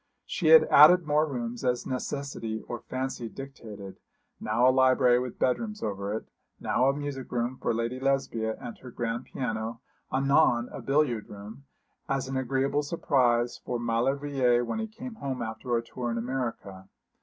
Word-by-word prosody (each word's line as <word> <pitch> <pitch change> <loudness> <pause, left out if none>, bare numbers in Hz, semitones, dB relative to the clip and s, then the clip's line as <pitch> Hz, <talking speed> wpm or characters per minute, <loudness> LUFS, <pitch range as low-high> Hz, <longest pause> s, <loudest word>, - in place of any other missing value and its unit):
She - - -2
had 480 -1 +9
added 180 -1 +7
more 150 +1 +2
rooms 120 -3 -4
as 125 -1 0
necessity 130 -4 -4
or 120 - -4
fancy 130 -2 -4
dictated, 105 -8 -9 0.4
now 115 +4 +2
a - - +7
library 130 -1 +4
with 125 0 -5
bedrooms 210 - -1
over 100 -1 -3
it, 110 - -6 0.3
now 130 +2 +2
a - - +2
music 145 -2 -5
room 120 +1 -1
for - - +1
Lady 115 +2 -2
Lesbia 130 -5 0
and 120 - -7
her 130 - -10
grand 120 +1 -3
piano 115 -2 -4 0.3
anon 135 -2 +3
a - - -7
billiard 135 -6 +1
room, 105 +6 -10 0.4
as 135 -1 -1
an 135 - -4
agreeable 135 +2 0
surprise 125 -6 +1
for 125 - -2
Maulevrier 120 +1 +1
when 220 - -3
he 220 - -2
came 240 +3 -8
home 140 - -4
after 110 +2 -2
a 115 - -2
tour 120 +1 -5
in 115 - -2
America. 115 -6 -4
125 Hz, 165 wpm, -28 LUFS, 115-135 Hz, 0.4 s, had